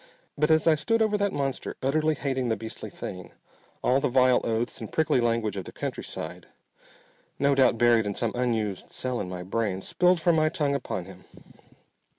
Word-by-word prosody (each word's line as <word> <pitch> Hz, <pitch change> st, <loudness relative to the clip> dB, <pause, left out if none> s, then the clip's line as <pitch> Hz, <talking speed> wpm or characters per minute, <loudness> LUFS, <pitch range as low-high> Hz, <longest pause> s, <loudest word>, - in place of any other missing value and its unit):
But 150 Hz, +2 st, +1 dB
as 160 Hz, -1 st, +4 dB
I 165 Hz, -, +6 dB
stood 225 Hz, +10 st, +1 dB
over 215 Hz, -1 st, +1 dB
that 200 Hz, -1 st, +1 dB
monster, 140 Hz, -4 st, -3 dB
utterly 155 Hz, +3 st, +2 dB
hating 130 Hz, -3 st, -2 dB
the 110 Hz, -, +2 dB
beastly 110 Hz, 0 st, -7 dB
thing, 90 Hz, -1 st, -8 dB, 0.5 s
all 130 Hz, +2 st, +3 dB
the 145 Hz, -, +1 dB
vile 125 Hz, 0 st, +4 dB
oaths 115 Hz, +1 st, -1 dB
and -, -, -7 dB
prickly 155 Hz, -5 st, +2 dB
language 115 Hz, -3 st, 0 dB
of 95 Hz, -, -4 dB
the -, -, -9 dB
countryside, 90 Hz, +2 st, -5 dB, 0.9 s
no 140 Hz, 0 st, +3 dB
doubt 130 Hz, -3 st, +4 dB
buried 115 Hz, -2 st, +4 dB
in 100 Hz, -, -3 dB
some 115 Hz, -2 st, -1 dB
unused 110 Hz, -6 st, -1 dB
cell 125 Hz, -1 st, -3 dB
in 90 Hz, -, -5 dB
my 90 Hz, -1 st, -5 dB
brain, 100 Hz, 0 st, -1 dB
spilled 180 Hz, 0 st, +2 dB
from 170 Hz, 0 st, +3 dB
my 155 Hz, 0 st, +3 dB
tongue 145 Hz, -3 st, 0 dB
upon 115 Hz, -9 st, -3 dB
him. 95 Hz, 0 st, -13 dB
125 Hz, 185 wpm, -27 LUFS, 110-150 Hz, 0.9 s, I